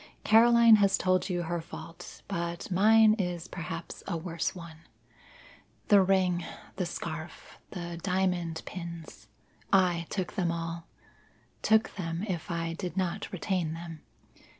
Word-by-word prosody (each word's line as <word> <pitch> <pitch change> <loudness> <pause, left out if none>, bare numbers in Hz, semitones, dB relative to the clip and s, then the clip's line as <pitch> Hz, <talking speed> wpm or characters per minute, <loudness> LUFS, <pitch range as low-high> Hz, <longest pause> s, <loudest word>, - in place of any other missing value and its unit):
Caroline 230 0 +7
has 200 -1 +3
told 185 +1 +1
you 175 -1 -1
her 170 0 -2
fault, 165 0 -10
but 170 -1 -4
mine 215 +3 +6
is 180 -2 -2
perhaps 165 -1 -6
a 170 - -1
worse 165 +1 -3
one. 170 -3 -10 1.1
The 205 -2 +7
ring 185 -2 +2 0.3
the 180 -2 -1
scarf 160 -1 -7
the 170 -3 -6
diamond 180 -3 -1
pins 170 - -8 0.4
I 175 -3 +3
took 185 -3 -3
them 180 -5 0
all 165 0 -5 0.7
took 220 -1 +2
them 165 -1 -3
if 175 -5 -4
I 165 -1 -2
did 180 +2 -5
not 185 +2 -2
retain 185 -4 -1
them. 165 -2 -8
175 Hz, 130 wpm, -29 LUFS, 165-190 Hz, 1.1 s, Caroline